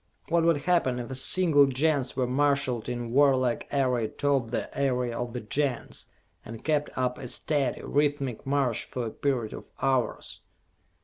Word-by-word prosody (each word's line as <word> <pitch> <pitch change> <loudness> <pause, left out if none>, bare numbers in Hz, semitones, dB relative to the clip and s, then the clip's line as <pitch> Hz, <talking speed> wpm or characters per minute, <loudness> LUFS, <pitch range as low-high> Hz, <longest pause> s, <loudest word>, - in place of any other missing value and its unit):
What 170 0 +3
would 165 -4 +3
happen 170 -8 +1
if 120 0 -6
a - - -3
single 145 +1 +4
Gens 135 -1 0
were 130 -1 +1
marshalled 130 -2 +1
in 120 -1 -4
warlike 130 -2 +3
array 125 -5 +1
atop 135 0 0
the - - -4
area 125 -3 0
of 120 -1 -4
the 125 - -4
Gens, 130 +3 -3 0.4
and 115 0 -9
kept 150 -1 0
up 125 -1 -1
a 125 - -6
steady, 140 0 -1
rhythmic 140 -4 0
march 135 -4 0
for 125 -2 -4
a 110 - -4
period 125 -6 -1
of - - -10
hours?" 130 -2 -1
130 Hz, 165 wpm, -27 LUFS, 125-145 Hz, 0.4 s, single